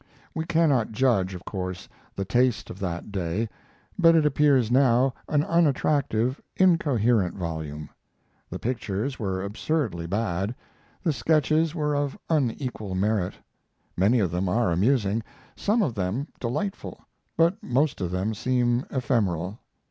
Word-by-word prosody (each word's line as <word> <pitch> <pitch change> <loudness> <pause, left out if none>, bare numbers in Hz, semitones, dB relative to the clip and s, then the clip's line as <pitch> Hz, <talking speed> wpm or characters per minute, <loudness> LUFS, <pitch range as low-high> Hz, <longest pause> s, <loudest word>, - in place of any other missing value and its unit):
We 160 0 -3
cannot 155 -10 +2
judge, 105 -7 +2
of 90 - -10
course, 95 -2 -5 0.3
the 100 - -3
taste 120 -1 +1
of 95 - -10
that 90 +1 -4
day, 95 +3 -1 0.5
but 165 -2 +6
it 160 -2 +4
appears 140 -5 +3
now 130 0 +4 0.2
an 150 -1 +2
unattractive, 140 -6 +1 0.2
incoherent 125 - +3
volume. 80 -4 -5 0.6
The - - -5
pictures 120 +1 -3
were 95 -3 -2
absurdly 105 - -2
bad, 100 +2 -1 0.5
the 165 -5 +2
sketches 155 +2 +2
were 150 -2 0
of 145 -1 -1
unequal 125 -8 -1
merit. 100 -1 0 0.6
Many 100 +7 +3
of 95 -5 +1
them 90 +2 -1
are 110 0 +2
amusing, 105 +3 +2 0.3
some 215 +2 +1
of 135 - -1
them 105 +9 -2
delightful, 195 - -3 0.4
but 170 +3 +3
most 135 +1 0
of 90 - -1
them 95 +5 -1
seem 120 +2 +1
ephemeral. 105 - -1
120 Hz, 135 wpm, -26 LUFS, 95-145 Hz, 0.6 s, but